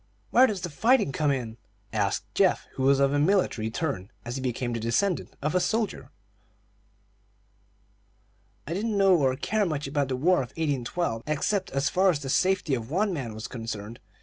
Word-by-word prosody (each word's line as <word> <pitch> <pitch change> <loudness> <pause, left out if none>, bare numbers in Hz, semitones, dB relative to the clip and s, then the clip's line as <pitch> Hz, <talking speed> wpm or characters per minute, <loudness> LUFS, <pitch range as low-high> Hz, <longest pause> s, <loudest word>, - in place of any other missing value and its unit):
"Where 255 +2 +6
does 200 -6 -3
the 175 - -4
fighting 230 - +3
come 150 +2 0
in?" 120 -5 -2 0.4
asked 100 -3 0
Geoff, - - +2
who - - -5
was 135 +1 +4
of 140 0 +3
a 145 - +2
military 150 - +1
turn, 115 - -3 0.2
as 120 +3 -4
became 125 -1 -2
the 115 - -2
descendant 115 - 0
of 150 - 0
a 180 - +3
soldier. 195 - -1 2.6
"I 165 - -4
didn't 210 +3 -1
know 195 -2 +5
or 135 -5 +2
care 215 +10 0
much 155 -6 -2
about 140 0 0
the 130 - -2
War 175 +8 +3
of 125 -3 -2
1812, 145 -3 -1
except 155 +7 0
as 135 +1 0
far 190 +1 +4
as 170 - +2
the 135 -2 -6
safety 185 -1 +2
of 115 -2 -2
one 195 +5 +1
man 125 -9 -4
was 110 +3 -6
concerned. 115 -2 -6
140 Hz, 180 wpm, -27 LUFS, 125-185 Hz, 2.6 s, Where